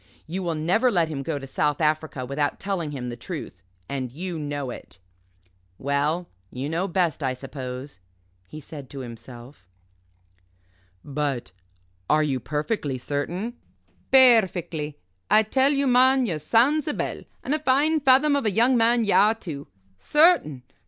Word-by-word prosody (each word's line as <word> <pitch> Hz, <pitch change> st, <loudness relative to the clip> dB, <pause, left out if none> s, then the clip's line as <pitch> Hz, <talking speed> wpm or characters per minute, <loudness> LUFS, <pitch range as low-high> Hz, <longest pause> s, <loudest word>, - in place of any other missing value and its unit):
You 180 Hz, +4 st, -4 dB
will 170 Hz, -3 st, -2 dB
never 180 Hz, +11 st, +2 dB
let 175 Hz, -8 st, +1 dB
him 145 Hz, -3 st, -4 dB
go 145 Hz, +2 st, -3 dB
to 135 Hz, -, -7 dB
South 145 Hz, +1 st, -1 dB
Africa 155 Hz, -4 st, 0 dB
without 145 Hz, +2 st, -2 dB
telling 190 Hz, -6 st, -2 dB
him 130 Hz, -4 st, -5 dB
the 120 Hz, -, -5 dB
truth 120 Hz, -, -7 dB, 0.3 s
and 130 Hz, -3 st, -4 dB
you 170 Hz, +4 st, -5 dB
know 145 Hz, -3 st, -4 dB
it." -, -, -11 dB, 0.8 s
"Well 145 Hz, +5 st, -1 dB, 0.2 s
you 130 Hz, +3 st, -5 dB
know 170 Hz, +4 st, -1 dB
best, 175 Hz, -4 st, 0 dB
I 130 Hz, -2 st, 0 dB
suppose," 130 Hz, -2 st, -7 dB, 0.5 s
he 155 Hz, -, -9 dB
said 145 Hz, -3 st, -10 dB
to 140 Hz, -, -7 dB
himself. 120 Hz, -1 st, -11 dB, 1.4 s
"But 140 Hz, -3 st, -3 dB, 0.6 s
are 155 Hz, 0 st, +4 dB
you 135 Hz, -4 st, -1 dB
perfectly 150 Hz, -, -2 dB
certain?" 175 Hz, -, -4 dB, 0.5 s
"Perfectly. 180 Hz, -, +4 dB, 0.3 s
I 215 Hz, -, +6 dB
tell 265 Hz, +6 st, +2 dB
you, 280 Hz, -1 st, +1 dB
man, 260 Hz, +1 st, +4 dB
you're 165 Hz, -8 st, -2 dB
sound's 265 Hz, -, +2 dB
a 295 Hz, -, -1 dB
bell, -, -, -3 dB, 0.2 s
and 275 Hz, -, -1 dB
a 305 Hz, -, +1 dB
fine 300 Hz, +3 st, +2 dB
fathom 280 Hz, +1 st, +4 dB
of 280 Hz, -, 0 dB
a -, -, +2 dB
young 235 Hz, +6 st, +3 dB
man 235 Hz, 0 st, +3 dB
ye 205 Hz, -, +1 dB
are, 215 Hz, +2 st, +5 dB
too. 155 Hz, -10 st, -7 dB, 0.3 s
Certain? 300 Hz, -, +3 dB
160 Hz, 155 wpm, -24 LUFS, 140-230 Hz, 1.4 s, I